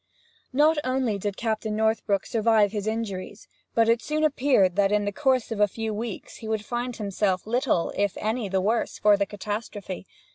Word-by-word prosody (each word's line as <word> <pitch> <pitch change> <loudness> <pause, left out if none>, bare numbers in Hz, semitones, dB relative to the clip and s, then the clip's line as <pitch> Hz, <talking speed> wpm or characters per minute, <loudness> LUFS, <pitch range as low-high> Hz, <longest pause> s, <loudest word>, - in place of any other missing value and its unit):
Not 300 +3 +4
only 255 -5 0
did 200 0 -3
Captain 220 -2 -2
Northbrook 220 -2 +1
survive 220 -2 +3
his 210 -1 -3
injuries, 210 -3 -4 0.3
but 230 -1 +4
it 230 0 +3
soon 305 +4 -1
appeared 260 - +3
that 200 0 +3
in 210 0 +2
the 205 - -1
course 260 -1 +1
of 220 - -3
a 210 - +5
few 220 +2 -4
weeks 220 0 -6
he 220 - -8
would 220 -1 -2
find 240 +1 -3
himself 200 -3 -1
little 235 - 0
if 200 -1 0
any 220 -1 -2
the 190 0 +1
worse 220 +4 0
for 210 0 +5
the 200 0 0
catastrophe. 205 -2 -5
215 Hz, 185 wpm, -26 LUFS, 205-235 Hz, 0.3 s, a